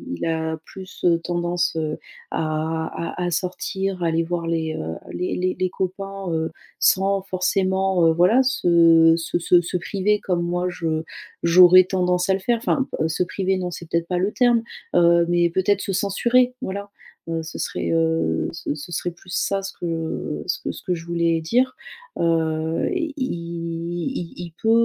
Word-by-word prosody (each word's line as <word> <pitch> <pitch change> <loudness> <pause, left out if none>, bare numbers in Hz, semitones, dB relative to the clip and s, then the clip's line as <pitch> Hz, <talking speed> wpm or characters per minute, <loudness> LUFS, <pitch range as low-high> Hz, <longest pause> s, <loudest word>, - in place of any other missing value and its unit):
il - - -4
a 160 -1 -1
plus, 190 -1 -9
heu, 170 -1 +4
tendance, 175 0 -1
heu, 155 -1 -2 0.3
à 160 +1 -1 0.3
à 180 - -2
à 175 - -1
sortir, 185 +1 -2
à - - +2
aller 165 0 +1
voir 170 0 -3
les, 160 -1 -1
heu, 80 +1 -4 0.2
les 180 - -2
les 185 0 0
les 185 0 0
copains, 195 +2 -4
heu, 160 -1 -1 0.3
sans 195 +1 +3
forcément, 190 -1 +1
heu, - - +5
voilà, 180 +10 +4
se 170 -9 +5
se 165 - -2
se 175 +1 +4
se 175 +1 -2
priver 200 +3 0
comme 180 -3 -1
moi 175 +1 -1
je 160 -2 -2 0.4
j'aurais 180 +2 +8
tendance 180 -1 0
à - - +5
le 190 - 0
faire 235 +5 +1
enfin, 265 +3 0
heu, 160 - +2
se 160 +2 0
priver 190 +1 -1
non 180 -1 -3
c'est 170 -1 -8
peut-être 170 0 0
pas 180 - -1
le 190 +4 0
terme, 240 -2 +3 0.3
heu, 170 0 +5
mais 175 0 +3
peut-être 190 +3 +1
se 195 - -3
censurer, 240 +6 +2
voilà, 200 +2 -5 0.4
heu, 165 0 -1
ce 160 - -8
serait, - - -2
heu, 160 - +1
ce 165 -3 -4
ce 155 +3 -9
serait 175 +1 -2
plus 175 +1 -15
ça 195 0 0
ce 195 0 -5
que, - - -4
heu, 165 -2 -3
ce 180 - -1
que - - -3
ce - - -11
que 180 - 0
je 165 -1 -6
voulais 170 -1 +1
dire, 250 +11 +1 0.4
heu, 160 -1 0
il 320 -5 -2
il 170 - -4
il 175 -1 -7
peut, 220 - +1
175 Hz, 185 wpm, -22 LUFS, 165-190 Hz, 0.4 s, j'aurais